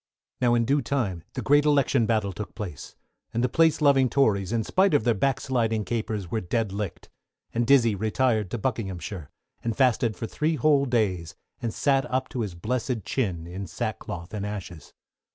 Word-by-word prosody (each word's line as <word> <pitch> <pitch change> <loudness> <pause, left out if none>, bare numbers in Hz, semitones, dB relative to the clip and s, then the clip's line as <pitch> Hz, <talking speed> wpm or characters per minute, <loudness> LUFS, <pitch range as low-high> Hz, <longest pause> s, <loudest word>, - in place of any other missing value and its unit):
Now 120 -1 +4
in 115 -1 +2
due 140 +4 +2
time 110 - -2
the - - -4
Great 145 +1 +5
Election 140 -5 +3
Battle 110 -4 0
took 105 - -7
place, 95 -10 -7 0.4
and 120 - +1
the - - +4
Place 160 +4 +3
loving 135 -3 +5
Tories, 105 -7 +2
in 115 -1 +1
spite 190 - +3
of 130 - +3
their 120 0 +3
back 135 +6 +1
sliding 115 -5 0
capers, 110 -5 -3
were 110 - 0
dead 105 +3 -1
licked; 100 -1 -5 0.4
and 115 0 0
Dizzey 120 -5 +5
retired 110 0 +1
to 120 - -3
Buckinghamshire, 100 - -4 0.3
and 115 -2 -2
fasted 125 -4 +2
for - - -4
three 155 +7 -1
whole 145 -2 +3
days, 95 -9 0 0.3
and 115 - -1
sat 135 +2 +1
up 130 0 -1
to 125 - -3
his 100 -6 -4
blessed 115 +4 -2
chin 95 -11 -1
in 95 +3 -6
sackcloth 85 +2 -5
and 105 -2 -3
ashes. 95 -6 -6
115 Hz, 185 wpm, -26 LUFS, 100-130 Hz, 0.4 s, Great